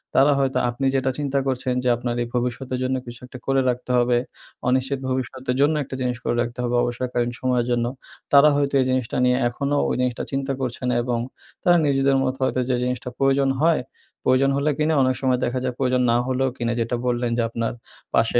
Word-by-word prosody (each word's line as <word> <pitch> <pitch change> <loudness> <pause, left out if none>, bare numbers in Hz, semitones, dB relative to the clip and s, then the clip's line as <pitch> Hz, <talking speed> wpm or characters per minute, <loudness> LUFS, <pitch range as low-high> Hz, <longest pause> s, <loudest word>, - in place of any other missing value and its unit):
তারা 140 +2 +6
হয়তো 135 -1 +1
আপনি 120 +3 -3
যেটা 130 0 +1
চিন্তা 140 -1 0
করছেন 130 -1 -1
যে 125 - +2
আপনার 120 0 -3
এই - - -5
ভবিষ্যতের 125 +1 -2
জন্য 130 +1 0
কিছু 120 0 -9
একটা 125 - -10
করে 135 0 +3
রাখতে 125 +1 -3
হবে 120 0 +3 0.5
অনিশ্চিত 130 +2 +1
ভবিষ্যতের 130 0 -2
জন্য 145 +2 +4
একটা 130 - -7
জিনিস 125 -1 -1
করে - - 0
রাখতে 120 +1 -4
হবে 120 0 0
অবসরকালীন 120 0 -1
সময়ের 125 -2 +1
জন্য, 120 -1 +1 0.5
তারা 140 +2 +8
হয়তো 140 -1 0
এই - - +1
জিনিসটা 130 +1 -1
নিয়ে 125 0 +3
এখনো 140 +4 -2
ওই - - 0
জিনিসটা 125 -1 -1
চিন্তা 135 0 -1
করছে 125 -2 -3
না - - +1
এবং 120 -1 -1 0.4
তারা 175 0 +5
নিজেদের 135 -1 +3
মতো 130 0 -1
হয়তো 130 - 0
যে 125 - +2
জিনিসটা 125 0 -2
প্রয়োজন 135 0 +2
হয়, 165 -2 +3 0.4
প্রয়োজন 130 +2 +3
হলে 140 +2 +1
কিনে 155 +1 +1
অনেক 130 0 +2
সময় 130 -2 +2
দেখা 125 +2 -1
যায় 130 -1 -1
প্রয়োজন 125 -1 +1
না 120 - +3
হলেও 130 0 +1
কিনে 120 0 -1
যেটা 115 +2 -1
বললেন 120 -1 0
যে - - +2
আপনার 115 0 -2 0.4
পাশে - - +3
130 Hz, 205 wpm, -23 LUFS, 125-135 Hz, 0.5 s, তারা